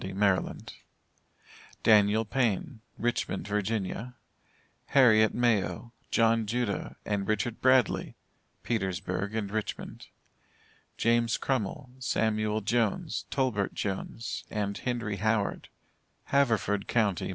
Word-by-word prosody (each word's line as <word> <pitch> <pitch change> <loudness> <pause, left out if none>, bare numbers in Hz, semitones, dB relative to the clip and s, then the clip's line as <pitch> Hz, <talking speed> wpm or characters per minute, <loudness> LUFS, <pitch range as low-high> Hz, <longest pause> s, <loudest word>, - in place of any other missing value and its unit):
Maryland; 100 -2 0 1.1
DANIEL 105 0 +5
PAYNE, 115 0 -1 0.2
Richmond, 120 -4 -1
Virginia; 105 +3 -2 0.7
HARRIET 110 -5 +5
MAYO, 120 0 0 0.2
JOHN 115 -1 +3
JUDAH, 120 -2 -2
and 100 -2 -1
RICHARD 110 +2 -1
BRADLEY, 130 -3 +3 0.5
Petersburg 95 -2 -2
and 105 -3 -2
Richmond; 110 0 -5 0.9
JAMES 115 0 +2
CRUMMILL, 130 +1 -2
SAMUEL 110 -3 0
JONES, 120 - 0
TOLBERT 125 -8 0
JONES, 105 +3 -4
and 100 -2 -2
HENRY 120 -5 -2
HOWARD, 110 0 0 0.5
Haverford 110 -7 +1
Co. 110 -4 +2
110 Hz, 90 wpm, -29 LUFS, 100-120 Hz, 1.1 s, DANIEL